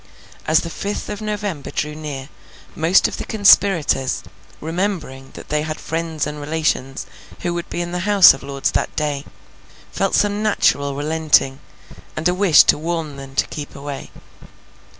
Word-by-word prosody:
As 155 +1 +4
the 170 - -6
fifth 205 +5 -4
of 210 +1 -5
November 205 -8 -4
drew 150 0 -3
near, 150 -3 -7 0.5
most 165 +4 +4
of - - -6
the - - -4
conspirators, 195 -10 +3 0.4
remembering 160 -6 -3
that - - -11
they 150 0 +1
had 155 0 -4
friends 165 -1 -3
and 150 0 -6
relations 145 -3 -1 0.4
who 175 - -1
would 170 0 -5
be 175 - -3
in 175 0 -4
the 180 - -2
House 200 +1 +7
of 135 - -9
Lords 140 0 -2
that - - -2
day, 150 -2 -2 0.7
felt - - 0
some 205 0 +1
natural 140 -9 +1
relenting, 150 -2 +2 0.6
and 155 +2 +1
a 180 - +2
wish 185 -4 +6
to - - +3
warn 160 -2 -3
them 135 -1 -10
to - - +2
keep 145 -1 -7
away. 140 0 -7
155 Hz, 165 wpm, -20 LUFS, 145-180 Hz, 0.7 s, House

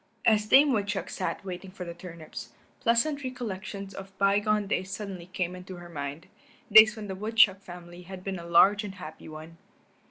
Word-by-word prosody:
As 215 -2 +4
Dame 275 +4 +6
Woodchuck 205 -2 -2
sat 190 +1 -4
waiting 185 0 -6
for 185 -1 -8
the 170 - -6
turnips, 165 -9 -10 0.3
pleasant 280 +5 +1
recollections 200 -6 -6
of 195 0 -10
bygone 205 +1 +2
days 190 -1 -2
suddenly 195 -4 -6
came 185 -1 -3
into 185 +1 -9
her 175 0 -11
mind, 145 +1 -6 0.5
days 215 +1 +9
when 215 -2 -7
the 190 - -4
woodchuck 205 -1 +3
family 175 -1 -11
had 185 +1 -10
been 190 -2 -4
a 170 - -9
large 200 +5 +5
and 200 -2 -7
happy 160 -4 -10
one. 155 +2 -10
190 Hz, 180 wpm, -28 LUFS, 175-210 Hz, 0.5 s, days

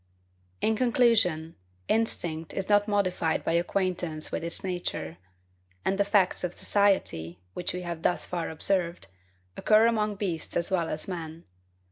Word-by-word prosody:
In 220 - +2
conclusion, 220 - +3 0.3
instinct 170 -8 -1
is 195 +1 -2
not 205 0 +4
modified 185 -5 +1
by - - +1
acquaintance 175 -2 -1
with - - -3
its 170 - -2
nature; 175 - -3 0.7
and 195 +1 +1
the - - +5
facts 200 -3 +2
of 180 0 -2
society, 140 - +1
which 180 - -2
we 180 +1 -5
have 170 -2 -5
thus 175 - +1
far 175 -2 -3
observed, 170 - +1 0.5
occur 215 +1 +5
among 215 -2 +1
beasts 185 -5 -3
as 175 +3 -1
well 170 -3 +1
as 155 - -4
men. 165 -3 -6
180 Hz, 145 wpm, -28 LUFS, 165-205 Hz, 0.7 s, the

